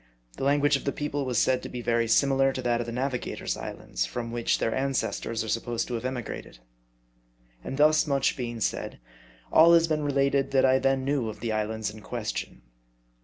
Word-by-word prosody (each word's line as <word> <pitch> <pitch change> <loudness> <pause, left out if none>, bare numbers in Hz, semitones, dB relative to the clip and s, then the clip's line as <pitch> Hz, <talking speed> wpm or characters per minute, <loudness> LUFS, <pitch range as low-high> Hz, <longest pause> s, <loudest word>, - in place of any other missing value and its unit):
The - - -4
language 145 +1 +3
of - - -11
the 140 - +1
people 145 -1 -3
was 125 -2 -1
said 130 +3 +2
to - - -7
be 120 -1 -6
very 115 0 +1
similar 135 +3 +3
to 130 - -4
that 120 -1 +1
of 120 - -3
the - - -4
Navigator's 125 +1 -3
islands, - - -4
from 115 - -4
which, 120 0 0
their 115 - -1
ancestors 130 -4 -1
are - - -6
supposed 115 +2 -2
to - - -4
have 115 +1 -3
emigrated. 125 - -5 1.1
And 135 - -5
thus 155 +1 +4
much 140 -2 +1
being 120 -3 -5
said, - - -2 0.5
all 170 +2 +8
has 165 0 +4
been 155 -1 0
related 140 -1 +1
that 135 - +5
I 130 0 +4
then 135 -1 +1
knew 135 -5 0
of 105 - -8
the 115 +1 -2
islands 110 0 -2
in 110 - -12
question. 95 - -5
130 Hz, 200 wpm, -27 LUFS, 115-140 Hz, 1.1 s, all